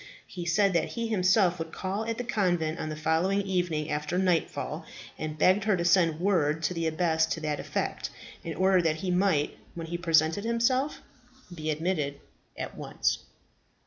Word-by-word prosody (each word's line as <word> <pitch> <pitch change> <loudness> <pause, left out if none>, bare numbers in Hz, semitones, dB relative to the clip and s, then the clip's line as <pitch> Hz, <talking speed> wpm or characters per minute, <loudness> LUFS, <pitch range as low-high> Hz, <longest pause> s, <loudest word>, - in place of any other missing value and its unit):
He 175 -2 -7
said 195 +3 +3
that 170 - 0
he 230 -1 -2
himself 185 -3 +3
would 165 0 -5
call 200 +3 -3
at 230 0 -2
the 245 - -2
convent 175 -8 0
on 155 - -3
the 155 - -4
following 165 +6 +1
evening 175 -5 -1
after 150 +3 -1
nightfall, 180 -3 0 0.3
and 155 0 -5
begged 185 +6 +4
her 210 -3 +3
to 170 - -1
send 170 -3 +4
word 165 -5 +1
to 180 - +1
the 165 -1 -1
abbess 160 0 +2
to 160 - -2
that 150 -2 -2
effect, - - -3 0.3
in 165 - -5
order 185 0 +4
that 160 -2 +1
he 185 +3 -3
might, 180 -5 +1 0.2
when 165 -1 -5
he 170 +1 -4
presented 165 +2 +3
himself, 235 +5 +1 0.5
be 155 -2 -4
admitted 155 -3 -1 0.4
at - - -5
once. - - -1
175 Hz, 175 wpm, -28 LUFS, 160-190 Hz, 0.5 s, begged